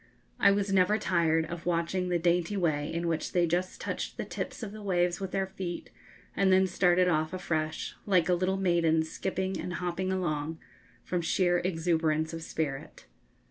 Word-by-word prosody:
I - - +6
was 200 0 +1
never 195 +3 +4
tired 165 -5 +2
of 170 +1 -7
watching 175 +2 0
the 175 - +2
dainty 175 +3 +1
way 155 -5 0
in 170 +1 -2
which 165 -1 -2
they 175 -1 +3
just 175 +2 -1
touched - - -4
the - - -3
tips - - -5
of 205 - -5
the 215 0 -9
waves 175 -3 +1
with 195 -1 -3
their 195 0 0
feet, 185 -2 -6 0.4
and 195 -1 +3
then 190 0 +5
started 180 -1 +3
off 155 -2 +1
afresh, 160 -4 -2
like 180 -5 +3
a 180 - +3
little 185 +2 +1
maiden 170 -4 +2
skipping 190 +3 -3
and 180 - -4
hopping 180 +2 -2
along, 160 -4 -2 0.5
from 180 -1 -1
sheer 175 +1 +2
exuberance 160 -3 0
of 165 - -5
spirit. 150 -4 -4
175 Hz, 180 wpm, -29 LUFS, 165-185 Hz, 0.5 s, I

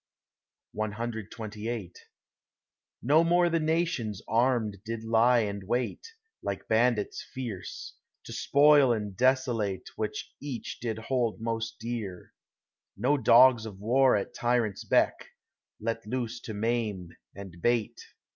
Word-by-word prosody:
CXXVIII 110 -1 -4 1.1
No 150 +7 +5
more 175 +1 +3
the 165 - +2
nations 155 - -1
armed 115 -3 +1
did 115 0 -5
lie 115 +2 +4
and 100 -2 -3
wait, 125 - -2 0.3
Like 100 -1 -4
bandits 110 -2 +1
fierce, 120 -8 -7 0.3
to - - -9
spoil 145 -2 +5
and 105 -3 -4
desolate 120 -6 +1
What - - -2 0.2
each 135 -6 -6
did 110 -2 -3
hold 115 0 -1
most 115 0 -3
dear—no 115 +3 -5
dogs 120 -2 +6
of 100 -3 -9
war 130 +5 +4
At 100 - -2
tyrant's 120 -4 0
beck, - - +2 0.5
let 115 0 -3
loose 120 0 -3
to 110 - -5
maim 105 -5 -1 0.3
and 95 -4 -10
bait. 120 0 0
115 Hz, 115 wpm, -28 LUFS, 105-125 Hz, 1.1 s, dogs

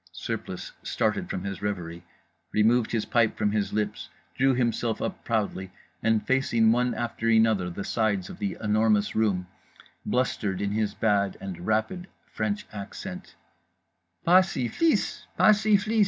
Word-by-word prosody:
_" - - -50
Surplice - - -5
started - - -1
from 90 - -3
his 100 -1 -5
reverie, 85 -4 -4 0.5
removed 110 +2 +3
his 115 -2 0
pipe 115 -2 +2
from 105 -1 +1
his 105 -1 -1
lips, 105 0 -2 0.2
drew 135 0 +3
himself 120 -2 0
up - - -4
proudly, 100 -4 -1 0.3
and—facing 115 0 +2
one 125 +1 +1
after 115 -1 -2
another 110 -5 +3
the 95 +3 -5
sides 100 -5 0
of - - -10
The 100 -2 -2
Enormous 105 -1 +2
Room—blustered 100 +1 -2
in 100 0 -1
his 105 -1 -1
bad 100 -3 +1
and 90 -3 -7
rapid 110 - 0 0.2
French 210 0 -3
accent: 100 -2 -8 0.9
"_Pas 185 +2 +7
syph'lis! 190 - 0
Pas 215 - +6
syph'lis! 215 +1 +2
110 Hz, 140 wpm, -27 LUFS, 100-120 Hz, 0.9 s, Pas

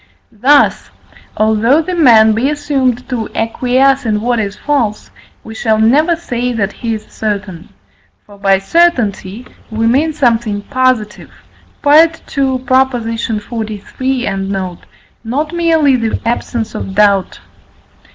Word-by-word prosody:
Thus, 265 +6 +2 0.5
although 220 +6 +3
the 365 - -4
man 230 -10 +5
be 235 +6 0
assumed 270 -5 -1
to 235 -4 -3
acquiesce 260 +4 +1
in 215 -3 0
what 240 +2 -1
is 200 -2 -3
false, 250 -8 -2 0.3
we 220 - -10
shall 220 0 0
never 290 +10 +3
say 250 -7 -3
that 205 -3 -2
he 230 -2 -3
is 215 0 -9
certain. 200 -6 -5 0.6
For 205 -1 -17
by 195 -1 +3
certainty 230 - 0 0.2
we 225 0 -2
mean 275 +8 +2
something 230 -7 0
positive 255 -5 -1 0.6
(II. 285 - +4 0.8
xliii. 235 -1 -2
and 195 0 -3
note), 185 -3 -5 0.4
not 290 +8 -3
merely 325 -5 +2
the 225 -2 -2
absence 230 -1 -2
of 190 - -6
doubt. 200 -2 +2
230 Hz, 120 wpm, -14 LUFS, 210-265 Hz, 0.8 s, man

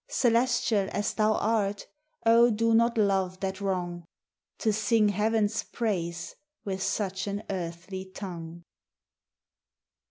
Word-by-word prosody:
Celestial 235 -4 +2
as 205 +1 -1
thou 215 0 +2
art, 205 -3 0 0.4
O 230 +1 +6
do 230 +1 +2
not 235 +1 +3
love 190 -3 +1
that 190 0 -3
wrong, 175 -3 -2 0.5
To 220 -2 +1
sing 220 0 +3
heaven's 215 +1 +1
praise 175 -7 -3 0.3
with 190 -1 -3
such 190 -1 -1
an 200 +1 -3
earthly 180 +1 -5
tongue. 170 -3 -8
200 Hz, 115 wpm, -28 LUFS, 185-225 Hz, 0.5 s, O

